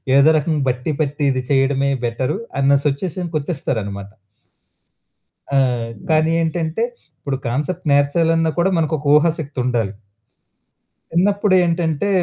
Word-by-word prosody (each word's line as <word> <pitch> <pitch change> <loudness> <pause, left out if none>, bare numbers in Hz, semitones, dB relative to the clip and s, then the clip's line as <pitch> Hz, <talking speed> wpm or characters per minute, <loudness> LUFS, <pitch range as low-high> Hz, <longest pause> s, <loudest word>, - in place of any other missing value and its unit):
ఏదో 140 +3 +6
రకంగా 150 -1 0
బట్టి 125 +5 -2
పట్టి 145 0 -2
ఇది 130 -1 -2
చేయడమే 135 0 +2 0.2
బెటరు 125 +9 -1 0.2
అన్న 140 +1 +4
సిచ్యుయేషన్‌కొచ్చేస్తారనమాట. 140 - -3 1.5
ఆ! - - +5 0.5
కానీ 155 0 +3
ఏంటంటే 165 +4 -1 0.4
ఇప్పుడు 140 -2 -3
కాన్సెప్ట్ 150 +7 -2
నేర్చాలన్న 165 +3 +2
కూడా 185 +3 +3
మనకొక 155 -2 -1
ఊహాశక్తి 150 -3 0
ఉండాలి. 115 -5 -1 1.2
చిన్నప్పుడేంటంటే 180 -3 +2
150 Hz, 100 wpm, -19 LUFS, 135-165 Hz, 1.5 s, ఏదో